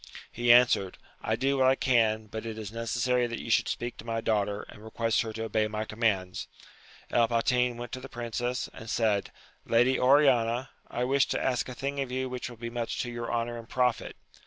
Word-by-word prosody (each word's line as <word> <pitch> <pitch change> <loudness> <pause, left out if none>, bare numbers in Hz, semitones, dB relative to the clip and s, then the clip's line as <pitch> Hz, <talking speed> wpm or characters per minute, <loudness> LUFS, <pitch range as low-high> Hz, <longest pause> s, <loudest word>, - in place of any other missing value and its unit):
He 120 +1 +3
answered, 120 -6 +5 0.2
I 110 - 0
do 135 +3 0
what 130 - +5
I 130 - +5
can, 110 -5 +2
but 110 +1 -6
it 110 -1 -5
is 105 -2 -6
necessary 120 +2 0
that 115 0 -5
you 115 - -5
should - - +3
speak 120 0 -3
to - - -9
my 115 0 -2
daughter, 105 -2 0
and 105 - -13
request 115 +1 0
her 110 - -4
to 110 +1 -4
obey 110 -1 0
my 105 0 -3
commands. 105 -5 -1 0.6
El 115 -1 +4
Patin 125 +1 +1
went 120 0 -7
to 130 - -5
the 135 +1 -10
princess, 120 +1 -3
and 115 - -10
said,^ 110 -4 +1 0.4
Lady 120 +3 +4
Oriana^ 125 -2 +4 0.2
I 120 - -3
wish 135 +2 +2
to - - -1
ask 125 -1 0
a 125 - -7
thing 140 +2 -3
of 135 -2 -2
you 130 0 -2
which 125 0 -5
will 120 - -11
be 115 +1 -6
much 120 -1 -3
to 120 - -5
your 120 0 -4
honour 120 0 -2
and 115 - -12
profit. 125 -3 0
120 Hz, 215 wpm, -28 LUFS, 110-125 Hz, 0.6 s, answered